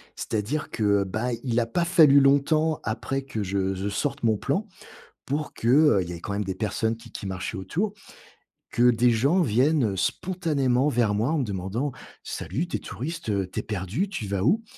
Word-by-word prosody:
C'est-à-dire 115 +8 -3
que, 100 -2 +2
bah, 110 +6 -2
il 120 -2 +1
a 115 - 0
pas 170 +9 0
fallu 160 -6 +6
longtemps 145 +3 +3
après 120 +5 -2
que 110 -6 -4
je 95 0 -1
je 95 +2 -3
sorte 140 +7 -2
mon 110 -2 +3
plan 150 - -1 0.6
pour 145 +2 -3
que, 115 - -2
heu- 140 -6 +5
il 85 - -7
y 90 - -5
avait 85 - -7
quand 100 - -5
même 100 +1 -1
des 95 - -3
personnes 110 +2 -1
qui 115 - -15
qui - - -6
marchaient 95 +3 -4
autour- 170 - -2 0.8
que 120 - +1
des 120 +1 +3
gens 140 +11 +3
viennent 125 - +2
spontanément 145 - 0
vers 120 -7 +2
moi, 110 +5 +1
en 160 - +1
me - - +1
demandant: 105 +6 -3 0.3
«Salut, 160 - -3
tu - - -1
es - - -10
touriste? 165 +6 -6
Heu, 100 -2 0
tu - - -3
es - - -4
perdu? 105 - -2
Tu 175 - -5
vas 100 -1 -1
où?» 210 - +3
120 Hz, 205 wpm, -25 LUFS, 100-150 Hz, 0.8 s, fallu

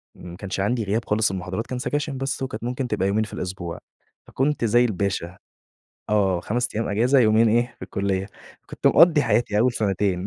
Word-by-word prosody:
ما 85 -1 -10
كانش 95 0 -5
عندي 110 +4 0
غياب 110 +3 -1
خالص 105 -1 +1
المحاضرات 95 +4 -4
كان 125 - -4
سكاشن 145 +2 -2
بس 135 +1 -3
وكانت 115 -4 -5
ممكن 125 +2 -3
تبقى 95 - 0
يومين 105 +2 +1
في 105 - -8
الأسبوع، 90 -2 -5 0.5
فكنت 135 -2 0
زي 120 +2 +4
الباشا، 95 -4 -2 0.7
آه، 95 -4 +2
5 120 +6 -1
أيام 110 +2 -1
إجازة 120 +7 +3
يومين 110 -1 +4
إيه، 120 +2 +1
في - - -14
الكلّية. 95 -1 -2 0.4
فكنت - - -5
مقضّي 165 -3 +6
حياتي 115 -2 +1
أول 125 +3 +3
سَنتين 100 -4 -1
110 Hz, 180 wpm, -23 LUFS, 95-125 Hz, 0.7 s, مقضّي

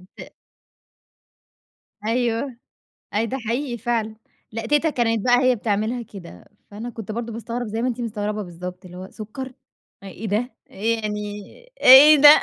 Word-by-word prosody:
ت - - -11 1.7
أيوه، 240 +2 0 0.6
أيوه 215 +2 +1
ده 260 +4 -3
حقيقي 240 +1 -3
فعلًا. 230 -2 -2 0.4
لأ 225 +1 -5
تيتة 295 +5 +2
كانت 230 -6 0
بقى 245 0 +5
هي 255 -1 +4
بتعملها 220 +2 -1
كده، 195 -7 -12 0.3
فأنا 220 +4 -6
كنت 225 -3 -7
برضه 230 +1 -4
باستغرب 235 +2 -4
زي 220 +2 -3
ما 250 - 0
أنتِ 245 0 -3
مستغربة 210 -2 -3
بالضبط 180 +1 -8
اللي 180 0 -11
هو 185 +1 -8
سكّر؟ 255 +5 -7 0.5
أ - - -11
إيه 195 +3 -7
ده؟ 220 +5 -1 0.2
إيه 225 +3 -1
يعني 210 -1 -3 0.6
إيه 280 +4 +10
ده؟ 295 +1 +9
230 Hz, 155 wpm, -22 LUFS, 210-245 Hz, 1.7 s, إيه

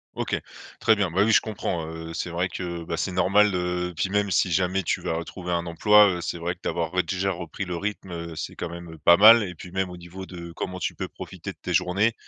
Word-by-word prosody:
OK, - - -1 0.4
très 110 -1 +4
bien. 100 -4 0
Bah, 95 +4 +3
oui, 110 - +3
je - - +7
comprends, 95 -6 -3
heu, 80 0 -7
c'est 85 +1 -3
vrai 90 +2 -1
que, 85 -1 -5
bah, 85 0 -4
c'est 95 - -1
normal, 100 +3 +4
heu, 90 0 -1
puis 95 - -1
même 100 -1 +1
si 90 - +2
jamais 95 +2 +1
tu - - -1
vas - - -2
retrouver 90 +2 -5
un 85 0 -1
emploi, 105 +5 +6
heu, - - -6
c'est 85 - -4
vrai 85 +1 -2
que 90 - -35
d'avoir, 85 0 -2
ouais, 90 - +2
déjà 95 0 -1
repris 85 +1 -5
le 90 -1 -4
rythme, 100 0 -4
heu, 85 -1 -6
c'est - - -5
quand 90 - -5
même, 85 0 -8
heu, - - -11
pas 85 +3 +6
mal 110 +2 +9
et 90 -2 -5
puis, 90 +1 -11
même 95 0 -1
au 90 - -8
niveau 85 +2 -9
de 85 -2 -9
comment 90 +1 -5
tu - - -2
peux - - -4
profiter - - -8
de - - -18
tes - - -3
journées. 95 +5 +2
90 Hz, 265 wpm, -25 LUFS, 85-95 Hz, 0.4 s, mal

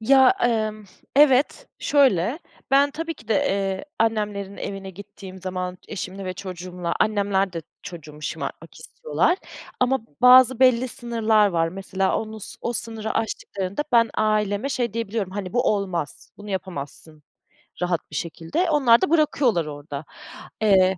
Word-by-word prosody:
Ya, 265 +3 +6
emm, 215 -3 0 0.3
evet, 290 - +4
şöyle, 260 - +3 0.3
ben 280 +1 +5
tabii 330 +3 -4
ki 225 - -18
de, 220 - +2
eee, 195 +4 0
annemlerin 210 -3 -1
evine 195 -1 -6
gittiğim 190 0 -11
zaman 185 -1 -4
eşimle 195 -1 -6
ve 185 - -3
çocuğumla, 180 -2 -5
annemler 200 -2 +1
de 165 -2 -5 0.2
çocuğumu 155 -3 -10
şımartmak - - -5
istiyorlar 475 -6 -1 0.4
ama 260 +1 +2 0.2
bazı 255 0 +7
belli 255 -1 +4
sınırlar 225 -3 +2
var. 165 -2 +1
Mesela 190 +1 -1
onu 220 0 -6
s - - -8
o 240 - -2
sınırı 225 -1 -4
aştıklarında 200 0 -2
ben 230 -2 +5
aileme 210 +2 +1
şey 245 -5 -1
diyebiliyorum 220 -3 -3
hani 190 -2 -5
bu 245 - +2
olmaz, 185 -6 -4
bunu 205 0 -10
yapamazsın 155 -4 -6 0.6
rahat 175 -3 -1
bir - - -7
şekilde. 170 - -2
Onlar 255 -6 +5
da - - +1
bırakıyorlar 280 - +2
orada. 145 0 -7 0.6
Eee 190 -3 +4
205 Hz, 140 wpm, -23 LUFS, 185-240 Hz, 0.6 s, bazı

